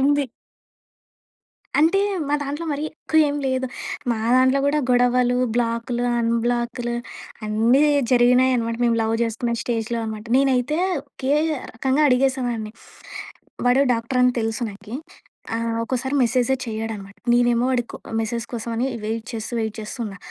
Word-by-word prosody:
ఉంది. 285 +1 +3 1.5
అంటే 330 +6 +4 0.3
మా 290 - +2
దాంట్లో 290 +4 -4
మరి 285 +1 -3
ఎక్కువ 315 0 -1
ఏంలేదు. 265 -2 -1 0.4
మా 225 - 0 0.2
దాంట్లో 260 +1 +4
గూడా 290 +1 +2
గొడవలు 245 0 +3 0.2
బ్లాకులు, 240 +1 -1 0.2
అన్‌బ్లాక్‍లు 235 +1 0 0.5
అన్నీ 230 +6 +3 0.3
జరిగినాయనమాట. 245 -1 +3
మేము 230 -1 +3
లవ్ 220 0 0
చేసుకునే 235 +1 -2
స్టేజ్‌‌లో 235 0 -2
అనమాట. 215 0 -5
నేనైతే 270 +2 +2 0.3
ఒకే 270 +1 -3 0.4
రకంగా 265 +5 +1
అడిగేసేదాన్ని. 250 -4 0 0.9
వాడు 255 +3 +5
డాక్టర‌ని 250 +2 +2
తెలుసు 225 +2 -2
నాకి. 205 +4 -10 0.6
ఆహ్, 230 0 -1
ఒక్కోసారి 260 +3 -2
మెసేజే 245 +2 +2
చేయడనమాట. 220 -3 -5 0.2
నేనేమో 240 0 +3
వాడికో 240 -2 -1
ఆహ్, - - -6
మెసేజ్ 230 +1 -2
కోసం 235 0 -4
అని 245 +3 +1 0.2
వెయిట్ 225 +1 -3
చేస్తూ 220 +1 -5
వెయిట్ 220 -1 -2
చేస్తూ 215 +4 -7
ఉన్నా. 200 -2 -6
240 Hz, 125 wpm, -22 LUFS, 230-260 Hz, 1.5 s, వాడు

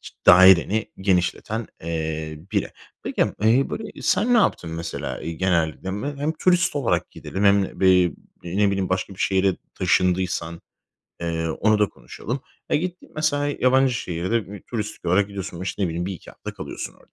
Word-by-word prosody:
ç - - -11
daireni 95 +4 +7
genişleten, 95 +4 0 0.2
eee, 80 -1 -3
biri. - - 0 0.3
Peki, - - 0 0.2
eee, 120 +5 +3
böyle, 215 -1 -6
sen 245 +4 +2
ne - - +6
yaptın, 90 - +1
mesela, 80 +1 -5
eee, 85 - -4
genelde? 85 0 0
M 135 +9 -4
hem 145 +3 -1
turist 180 0 +2
olarak 140 -5 0
gidelim 95 +2 -4
hem 100 -1 +3
b 95 - +4
eee, 90 -2 +5 0.5
ne 105 - +5
bileyim, 95 -2 -1
başka 95 +1 -2
bir - - -20
şehre 95 -1 +2 0.2
taşındıysan, 90 -2 0 0.6
eee, 80 -1 -2
onu 110 +6 +2
da 105 - +3
konuşalım. 125 +8 -6 0.3
Ya, - - +4
gittin, 175 +3 -4
mesela, 145 -2 +1
yabancı 130 0 +4
şehirde 95 +2 -2
bir 105 - -9
turistik 105 -6 -5
olarak 95 +3 +3
gidiyorsun. 100 -3 -6
O, - - -4
işte, 95 +2 -3
ne - - +3
bileyim, 85 +2 -3
1-2 95 -3 -7
hafta - - -8
kalıyorsun - - -6
orada. - - -25
95 Hz, 170 wpm, -23 LUFS, 85-115 Hz, 0.6 s, daireni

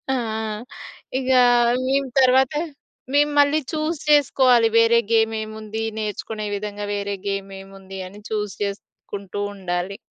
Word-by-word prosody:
ఆహ్, 220 -2 -3 0.6
ఇగ 260 0 -1 0.6
మేము 275 0 +1
తర్వాత 260 +2 +4 0.6
మేము 295 +1 +4
మళ్ళీ 290 +2 +4
చూస్ 310 0 -1
చేసుకోవాలి 255 -5 +5
వేరే 230 +1 +5
గేమ్ 225 0 +3
ఏముంది? 215 0 -6 0.2
నేర్చుకునే 215 0 -4
విధంగా 205 0 -5
వేరే 200 0 -3
గేమ్ 195 0 -3
ఏముంది 195 0 -11
అని 205 +3 -13
చూస్ 210 -2 -2
చేసుకుంటూ 200 0 -6
ఉండాలి. 185 0 -3
215 Hz, 120 wpm, -22 LUFS, 200-255 Hz, 0.6 s, చేసుకోవాలి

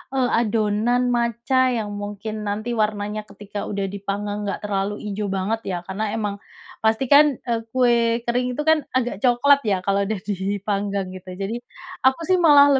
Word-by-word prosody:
eee, 255 -2 +2
adonan 230 +3 +1
matcha 235 +2 +2
yang 225 -4 -1
mungkin 210 +1 -5
nanti 215 +4 -2
warnanya 210 -1 -1
ketika 205 0 -7
udah 195 -1 -2
dipanggang 205 +1 -3
enggak 200 - -4
terlalu 205 0 -2
ijo 205 +1 -2
banget 195 +3 -1
ya. 185 - -1
Karena 205 +4 -3
emang 205 -2 -2 0.4
pastikan, 265 +6 +4
eee, 235 -2 0 0.2
kue 235 -2 +3
kering 250 +1 0
itu 300 - -2
kan 315 -2 +3
agak 245 -6 0
coklat 265 +4 +4
ya 190 -2 +1
kalau 200 0 +1
udah 215 -3 -2
dipanggang 200 0 -2
gitu. 185 0 -9
Jadi 200 +5 -3 0.4
aku 265 +5 +2
sih 370 +2 +2
malah 285 -4 +7
215 Hz, 160 wpm, -22 LUFS, 200-245 Hz, 0.4 s, malah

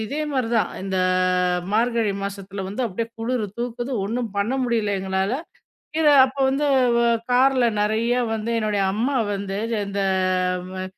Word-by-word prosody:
இதேமாரி 280 -3 -2
தான் 225 - +2
இந்த 190 -1 -2 0.8
மார்கழி 230 -1 +1
மாசத்துல 200 0 -5
வந்து 210 +7 -4
அப்பிடியே 230 +2 -3
குளிரு 230 -1 -1
தூக்குது 240 +2 -4
ஒன்னும் 235 +2 -2
பண்ணமுடியல 235 -1 0
எங்களால. 190 +3 -1 0.7
இத 315 - +3 0.2
அப்போ 265 +1 -8
வந்து 280 +2 0 0.3
வ - - +3 0.3
கார்ல 255 0 +4 0.2
நிறைய 220 +3 +1 0.2
வந்து 220 +1 -3
என்னுடைய 210 -2 0
அம்மா 250 +6 0 0.2
வந்து 195 0 -4 0.3
இந்த 200 0 -3 0.8
அ - - -3
230 Hz, 130 wpm, -23 LUFS, 200-250 Hz, 0.8 s, கார்ல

